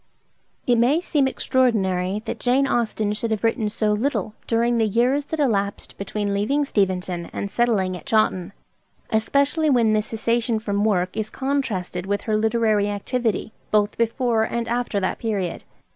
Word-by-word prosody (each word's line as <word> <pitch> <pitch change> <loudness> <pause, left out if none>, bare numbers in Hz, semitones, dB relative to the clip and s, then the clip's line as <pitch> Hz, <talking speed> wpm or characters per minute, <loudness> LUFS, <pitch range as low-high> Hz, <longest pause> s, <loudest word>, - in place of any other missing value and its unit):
It 240 -2 +3
may 265 +7 +4
seem 295 -6 +1
extraordinary 210 -8 +1
that - - -4
Jane 255 +3 +2
Austen 220 -4 0
should 225 +2 -2
have 220 -1 -2
written 225 -1 +1
so 210 0 +1
little 215 -2 -1
during 235 +1 +2
the 220 - +3
years 250 +7 +1
that 320 +1 -4
elapsed 205 -8 -1
between 200 +1 -3
leaving 270 +9 +1
Steventon 185 -6 -1
and 200 - -4
settling 205 -6 +1
at 180 - -10
Chawton; 215 -7 +1 0.6
especially 280 +8 +2
when 235 -5 +3
this 215 0 +1
cessation 230 +1 0
from 205 -1 -1
work 180 -4 +1
is 220 0 -2
contrasted 215 -11 -2
with 205 0 0
her 215 - -1
literary 215 -1 +2
activity 220 +1 -2 0.2
both 210 -1 +2
before 230 0 +1
and 235 +1 -1
after 240 -3 -1
that 185 - -2
period. 200 -6 -2
220 Hz, 160 wpm, -23 LUFS, 205-240 Hz, 0.6 s, may